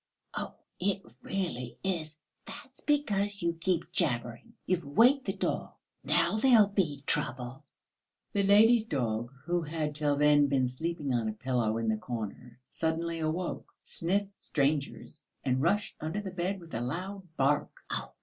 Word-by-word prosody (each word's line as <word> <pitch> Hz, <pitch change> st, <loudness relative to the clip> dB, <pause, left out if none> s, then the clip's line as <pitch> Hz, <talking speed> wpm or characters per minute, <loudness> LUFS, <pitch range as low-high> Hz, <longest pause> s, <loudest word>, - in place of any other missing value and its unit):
Oh, -, -, -4 dB, 0.2 s
it 195 Hz, +1 st, 0 dB, 0.2 s
really 165 Hz, -11 st, -3 dB
is.... 160 Hz, -5 st, -2 dB, 0.3 s
That's 260 Hz, -1 st, -8 dB
because 205 Hz, -, +1 dB
you 170 Hz, 0 st, +2 dB
keep 170 Hz, 0 st, -1 dB
jabbering. 120 Hz, -10 st, -1 dB
You've 180 Hz, -2 st, +1 dB
waked 245 Hz, -, +4 dB
the -, -, -1 dB
dog, -, -, -2 dB, 0.3 s
now -, -, +3 dB
there 245 Hz, +1 st, +6 dB
will 205 Hz, -, +4 dB
be 160 Hz, -9 st, 0 dB
trouble." 125 Hz, +3 st, -1 dB, 0.7 s
The 205 Hz, -, +3 dB
lady's 215 Hz, +3 st, +6 dB
dog, 120 Hz, -, -1 dB
who 175 Hz, +1 st, +1 dB
had 155 Hz, -1 st, -2 dB
till 145 Hz, -1 st, +1 dB
then 145 Hz, 0 st, +5 dB
been 135 Hz, -2 st, +2 dB
sleeping 145 Hz, +1 st, -2 dB
on 115 Hz, -2 st, +1 dB
a -, -, -3 dB
pillow 115 Hz, -2 st, 0 dB
in 115 Hz, 0 st, -1 dB
the 110 Hz, 0 st, +2 dB
corner, 120 Hz, +1 st, -6 dB
suddenly 165 Hz, +1 st, -1 dB
awoke, 160 Hz, +3 st, -2 dB
sniffed 195 Hz, +4 st, -1 dB
strangers 140 Hz, -1 st, -1 dB, 0.2 s
and 130 Hz, 0 st, +1 dB
rushed 200 Hz, +6 st, +1 dB
under 160 Hz, +6 st, -2 dB
the 200 Hz, -2 st, -5 dB
bed 185 Hz, +2 st, -2 dB
with 170 Hz, -2 st, -13 dB
a 115 Hz, -, -1 dB
loud 185 Hz, +9 st, -4 dB
bark. 145 Hz, +2 st, +2 dB
160 Hz, 150 wpm, -30 LUFS, 130-195 Hz, 0.7 s, there